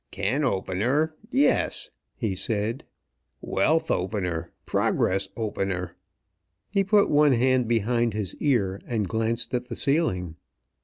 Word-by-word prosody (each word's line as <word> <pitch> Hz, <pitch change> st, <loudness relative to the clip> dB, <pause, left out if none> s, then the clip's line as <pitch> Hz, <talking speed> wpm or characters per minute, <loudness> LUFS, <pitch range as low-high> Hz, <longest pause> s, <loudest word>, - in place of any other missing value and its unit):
"Can 100 Hz, -, -1 dB
opener, 125 Hz, -, 0 dB, 0.2 s
yes!" 290 Hz, -, +1 dB, 0.2 s
he 110 Hz, -6 st, -2 dB
said. 110 Hz, +5 st, -2 dB, 0.5 s
"Wealth 160 Hz, +11 st, +1 dB
opener; 90 Hz, -3 st, -2 dB
progress 95 Hz, +1 st, +1 dB
opener!" 95 Hz, -5 st, -2 dB, 0.8 s
He 200 Hz, -1 st, +2 dB
put 200 Hz, +1 st, +4 dB
one 145 Hz, -1 st, +4 dB
hand 130 Hz, 0 st, +2 dB
behind 115 Hz, 0 st, +1 dB
his 105 Hz, -4 st, -3 dB
ear, 100 Hz, -9 st, +1 dB
and 110 Hz, -5 st, -1 dB
glanced 115 Hz, +2 st, -1 dB
at 125 Hz, 0 st, -1 dB
the -, -, -5 dB
ceiling. 95 Hz, -, 0 dB
115 Hz, 115 wpm, -26 LUFS, 95-135 Hz, 0.8 s, put